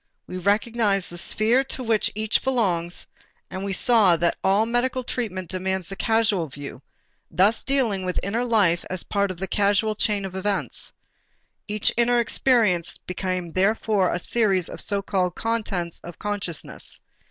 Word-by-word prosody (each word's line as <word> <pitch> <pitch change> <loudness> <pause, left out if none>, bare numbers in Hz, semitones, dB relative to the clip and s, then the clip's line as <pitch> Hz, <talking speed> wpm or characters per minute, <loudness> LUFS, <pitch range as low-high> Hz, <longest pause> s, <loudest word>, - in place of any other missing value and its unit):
We 185 - -6
recognized 205 0 +1
the 175 - -7
sphere 230 +8 +3
to 260 - -4
which 225 -3 +1
each 215 0 +1
belongs 180 -10 0 0.5
and 185 - -5
we 200 - -2
saw 205 -2 +5
that 170 +1 +1
all 200 +3 +3
medical 245 +2 0
treatment 205 -8 -4
demands 190 -1 -2
the 195 - -5
causal 220 -6 +1
view, 140 -1 -9 0.5
thus 200 +5 +2
dealing 245 -8 0
with 180 -1 -1
inner 220 +5 -1
life 205 -8 +2
as 185 -2 -2
part 200 -1 0
of 185 - -5
the 190 +2 -4
causal 205 +2 +2
chain 210 -1 0
of 190 -1 -7
events. 200 +1 -2 0.8
Each 210 -1 +1
inner 240 0 +3
experience 225 -7 +2
became 180 -1 -4
therefore 195 +1 +1
a - - 0
series 195 -2 +1
of - - -5
so 200 -1 0
called 180 -3 -1
contents 205 -7 -2
of 175 -1 -9
consciousness. 205 -6 -4
200 Hz, 155 wpm, -24 LUFS, 185-225 Hz, 0.8 s, saw